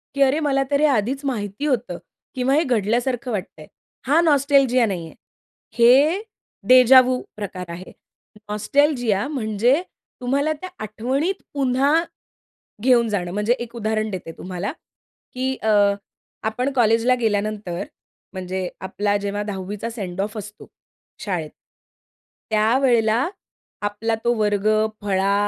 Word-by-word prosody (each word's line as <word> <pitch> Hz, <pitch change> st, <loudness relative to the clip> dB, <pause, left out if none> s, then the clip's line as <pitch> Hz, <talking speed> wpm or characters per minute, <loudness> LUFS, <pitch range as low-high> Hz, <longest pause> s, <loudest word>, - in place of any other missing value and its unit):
की 280 Hz, -, -1 dB
अरे! 275 Hz, +2 st, +4 dB
मला 275 Hz, -3 st, +1 dB
तर 280 Hz, -, +3 dB
हे 305 Hz, -, +4 dB
आधीच 265 Hz, +2 st, 0 dB
माहिती 215 Hz, -1 st, -3 dB
होतं 245 Hz, -10 st, -1 dB, 0.4 s
किंवा 260 Hz, +1 st, +1 dB
हे 310 Hz, -, +3 dB
घडल्यासारखं 245 Hz, -, 0 dB
वाटतं 185 Hz, -6 st, -5 dB
आहे. 155 Hz, -, -12 dB, 0.4 s
हां 315 Hz, +5 st, +4 dB
नॉस्टॅल्जिया 275 Hz, -5 st, +4 dB
नाही 185 Hz, -6 st, -3 dB
आहे. -, -, -14 dB, 0.6 s
हे 275 Hz, -, +5 dB, 0.5 s
देजावू 255 Hz, 0 st, +7 dB
प्रकार 185 Hz, -4 st, -6 dB
आहे. 180 Hz, +2 st, -9 dB, 0.6 s
नॉस्टॅल्जिया 240 Hz, -1 st, +1 dB
म्हणजे 245 Hz, -, +1 dB, 0.4 s
तुम्हाला 280 Hz, +5 st, +1 dB
त्या 370 Hz, -, -6 dB
आठवणीत 260 Hz, -, -2 dB
पुन्हा 280 Hz, +3 st, +2 dB, 0.8 s
घेऊन 240 Hz, -2 st, +4 dB
जाणं. 180 Hz, -4 st, -2 dB
म्हणजे 210 Hz, +5 st, +1 dB
एक 240 Hz, 0 st, -7 dB
उदाहरण 220 Hz, -1 st, -1 dB
देते 185 Hz, -4 st, -6 dB
तुम्हाला 185 Hz, +4 st, -4 dB, 0.6 s
की 260 Hz, +1 st, -1 dB
अ, 220 Hz, -, +2 dB, 0.8 s
आपण 250 Hz, +5 st, -1 dB
कॉलेजला 235 Hz, 0 st, +3 dB
गेल्यानंतर 205 Hz, -4 st, -1 dB, 0.5 s
म्हणजे 185 Hz, -1 st, -4 dB, 0.2 s
आपला 205 Hz, +2 st, -1 dB
जेव्हा 205 Hz, +1 st, -2 dB
10वीचा 205 Hz, +2 st, -5 dB
सेंड 195 Hz, -5 st, -5 dB
ऑफ 215 Hz, +2 st, -4 dB
असतो 210 Hz, 0 st, -9 dB, 0.6 s
शाळेत. 175 Hz, -6 st, -3 dB, 1.0 s
त्यावेळेला 230 Hz, +2 st, +3 dB, 0.6 s
आपला 225 Hz, +2 st, -2 dB
तो 240 Hz, -, +3 dB
वर्ग, 210 Hz, -1 st, +1 dB, 0.3 s
फळा, 195 Hz, -1 st, +1 dB
230 Hz, 120 wpm, -22 LUFS, 205-265 Hz, 1.0 s, देजावू